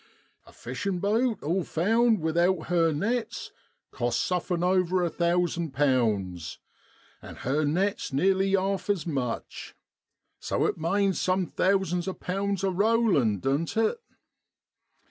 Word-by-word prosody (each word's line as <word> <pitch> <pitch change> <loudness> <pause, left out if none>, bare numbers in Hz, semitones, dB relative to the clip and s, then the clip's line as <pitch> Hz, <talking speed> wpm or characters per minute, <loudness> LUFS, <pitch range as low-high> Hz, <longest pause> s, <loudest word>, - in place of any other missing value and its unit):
A - - -15
fishin' 195 -2 -4
boat, 220 +4 0
all 175 +5 0
found, 225 +6 +2
without 170 +2 +1
her 165 -2 +3
nets, 220 +9 -2 0.4
costs 120 0 -1
sufrm' 180 -1 -1
over 185 0 +2
a 170 - 0
thousand 170 -3 0
pounds, 110 - 0 0.6
and - - -11
her 145 +4 -1
nets 185 +7 -1
nearly 190 +7 +2
'arf 195 0 -1
as 195 -6 0
much, 130 -8 -4 0.6
So - - -1
it - - -1
manes 195 +3 +1
some 185 0 +1
thousands 185 0 0
o' 190 - -3
pounds 195 +1 -2
a 195 - +1
rollin', 190 - +2
doan't 145 +9 -1
it 225 - +1
180 Hz, 125 wpm, -27 LUFS, 155-195 Hz, 0.6 s, her